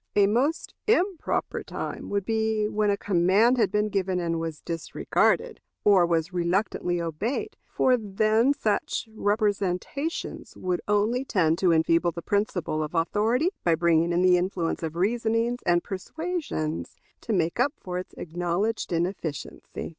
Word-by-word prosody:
A 205 - +6
most 255 +11 0
improper 390 -5 0
time - - -6
would 200 -1 -1
be 220 -1 0
when 210 0 0
a 200 - +2
command 200 +6 +3
had 210 -4 +2
been 210 0 +1
given 190 -2 0
and 165 -1 -1
was 165 -2 -4
disregarded, 165 -1 0 0.2
or 190 -4 +5
was 170 +1 0
reluctantly 175 0 0
obeyed; 170 - -3
for 255 - +3
then 215 +3 +2
such 220 -4 -1
representations 205 - -2
would 180 -1 -2
only 210 +5 +2
tend 170 -9 +1
to 180 -2 +3
enfeeble 165 +1 +3
the 170 - -7
principle 190 -6 -1
of 155 +2 -4
authority 220 - +1
by 170 -2 +3
bringing 170 0 +2
in 175 +1 +2
the 180 -1 +6
influence 175 -2 -2
of 160 -1 -4
reasonings 230 +5 0
and 175 0 +3
persuasions 245 - -4 0.3
to - - -5
make 170 -1 0
up 275 +4 +2
for 180 -1 -4
its 180 - -9
acknowledged 175 +7 -2
inefficiency. 170 -3 -4
195 Hz, 145 wpm, -26 LUFS, 170-220 Hz, 0.3 s, A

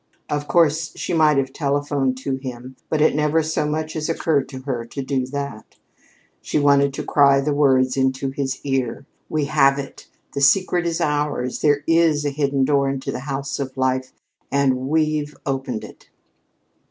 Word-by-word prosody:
Of 145 0 -2
course, 160 -2 +2
she - - -3
might 155 -3 +4
have 135 -1 -1
telephoned 140 -2 0
to 135 -1 -1
him, 130 -1 -8
but 155 - 0
it 155 - +4
never 150 +2 +2
so 155 -1 -1
much 155 +1 -3
as 155 +1 -2
occurred 155 -4 0
to 130 -1 -8
her 125 -4 -3
to 135 +4 -6
do 130 -1 -1
that. 140 -5 -6 0.6
She - - -2
wanted 140 -1 +4
to - - -4
cry 140 -1 +4
the 145 +2 0
words 130 -3 +3
into 130 0 0
his 135 -1 -3
ear: 135 -1 -2 0.2
"We 155 -2 0
have 140 -2 +3
it! 140 -1 -8 0.3
The 140 - -3
secret 175 +4 +3
is 170 0 -2
ours! 150 -5 -1
There 145 -1 +2
is 165 -3 +3
a 145 - 0
hidden 140 -1 +1
door 140 -1 +2
into 135 -1 -3
the - - -4
house 135 +1 -4
of 135 -1 -5
life 130 0 0 0.4
and 135 -2 +1
we've 155 -1 0
opened 135 -4 -3
it!" - - -13
140 Hz, 175 wpm, -21 LUFS, 135-150 Hz, 0.6 s, might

